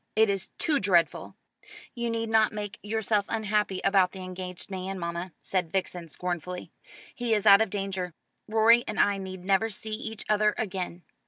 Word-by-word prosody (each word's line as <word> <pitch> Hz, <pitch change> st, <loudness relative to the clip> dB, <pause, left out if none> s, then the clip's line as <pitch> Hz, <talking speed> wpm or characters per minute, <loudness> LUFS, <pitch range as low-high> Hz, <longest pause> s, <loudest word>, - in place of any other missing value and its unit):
It 220 Hz, -1 st, +5 dB
is 195 Hz, -2 st, -3 dB
too 300 Hz, -3 st, +2 dB
dreadful." 175 Hz, -5 st, +1 dB, 0.6 s
"You 235 Hz, -1 st, -2 dB
need 230 Hz, 0 st, -2 dB
not 220 Hz, -1 st, +4 dB
make 205 Hz, -2 st, -5 dB
yourself 210 Hz, -1 st, 0 dB
unhappy 210 Hz, -3 st, 0 dB
about 195 Hz, -2 st, +3 dB
the 190 Hz, -1 st, -7 dB
engaged 185 Hz, 0 st, -7 dB
man, 190 Hz, 0 st, -4 dB
mamma," 170 Hz, +1 st, -4 dB
said 180 Hz, -4 st, -1 dB
Vixen 180 Hz, -3 st, -2 dB
scornfully. 180 Hz, +2 st, -4 dB, 0.4 s
"He 240 Hz, -2 st, 0 dB
is 210 Hz, 0 st, -1 dB
out 200 Hz, 0 st, +9 dB
of 220 Hz, -, +2 dB
danger. 190 Hz, -4 st, -3 dB, 0.3 s
Rorie 225 Hz, +2 st, +5 dB
and 215 Hz, -, -3 dB
I 200 Hz, -1 st, +3 dB
need 185 Hz, -1 st, -7 dB
never 200 Hz, +3 st, +3 dB
see 220 Hz, +1 st, -6 dB
each 220 Hz, 0 st, -5 dB
other 210 Hz, 0 st, +3 dB
again. 185 Hz, -4 st, -4 dB
200 Hz, 170 wpm, -28 LUFS, 185-220 Hz, 0.6 s, out